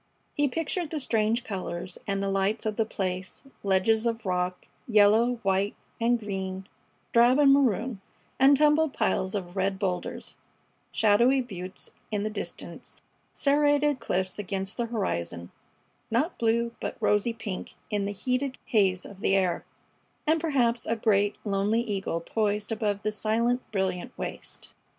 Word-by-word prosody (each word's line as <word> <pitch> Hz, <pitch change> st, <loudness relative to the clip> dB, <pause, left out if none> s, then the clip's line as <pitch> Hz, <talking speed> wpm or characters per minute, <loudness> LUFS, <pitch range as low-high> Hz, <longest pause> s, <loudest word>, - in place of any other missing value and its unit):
He 290 Hz, 0 st, +2 dB
pictured 325 Hz, +3 st, -2 dB
the 310 Hz, -, -2 dB
strange 230 Hz, -2 st, +1 dB
colors 185 Hz, -5 st, -5 dB
and 195 Hz, -1 st, 0 dB
lights 195 Hz, +4 st, 0 dB
of 215 Hz, -1 st, -1 dB
the 220 Hz, 0 st, 0 dB
place; 185 Hz, -3 st, -3 dB, 0.2 s
ledges 205 Hz, +4 st, +2 dB
of 230 Hz, -1 st, -2 dB
rock, 180 Hz, 0 st, -1 dB, 0.2 s
yellow, 220 Hz, +2 st, +5 dB
white 195 Hz, +1 st, +1 dB, 0.3 s
and 240 Hz, +1 st, +3 dB
green, 190 Hz, -2 st, -4 dB, 0.5 s
drab 240 Hz, +2 st, +6 dB
and 280 Hz, -2 st, +6 dB
maroon, 250 Hz, -5 st, +1 dB, 0.4 s
and 275 Hz, +1 st, +7 dB
tumbled 300 Hz, 0 st, +4 dB
piles 190 Hz, +2 st, 0 dB
of 180 Hz, -2 st, -4 dB
red 190 Hz, 0 st, 0 dB
boulders, 185 Hz, -3 st, -3 dB, 0.5 s
shadowy 235 Hz, +5 st, +4 dB
buttes 190 Hz, -7 st, -6 dB, 0.2 s
in 210 Hz, -2 st, -1 dB
the 215 Hz, -, -2 dB
distance, 210 Hz, -, -6 dB, 0.3 s
serrated 290 Hz, 0 st, +3 dB
cliffs 185 Hz, +2 st, -2 dB
against 195 Hz, -1 st, -3 dB
the 235 Hz, -, -1 dB
horizon, 85 Hz, -, -3 dB, 0.6 s
not 275 Hz, +10 st, 0 dB
blue, 235 Hz, +1 st, +2 dB
but -, -, -4 dB
rosy 210 Hz, +1 st, +2 dB
pink 215 Hz, -5 st, -6 dB, 0.2 s
in 205 Hz, -1 st, 0 dB
the 200 Hz, -, -2 dB
heated 255 Hz, +6 st, -1 dB
haze 190 Hz, -5 st, +2 dB
of 200 Hz, -2 st, -11 dB
the 195 Hz, -, +2 dB
air, 185 Hz, -3 st, +1 dB, 0.6 s
and 315 Hz, +1 st, +2 dB
perhaps 245 Hz, -7 st, +1 dB
a 230 Hz, -, +1 dB
great, 205 Hz, -2 st, +2 dB
lonely 205 Hz, +3 st, +1 dB
eagle 200 Hz, -7 st, -2 dB
poised 210 Hz, +3 st, -1 dB
above 210 Hz, -2 st, -1 dB
the 215 Hz, -, 0 dB
silent, 230 Hz, +4 st, +1 dB
brilliant 190 Hz, +3 st, -2 dB
waste. -, -, -7 dB
215 Hz, 145 wpm, -27 LUFS, 195-240 Hz, 0.6 s, and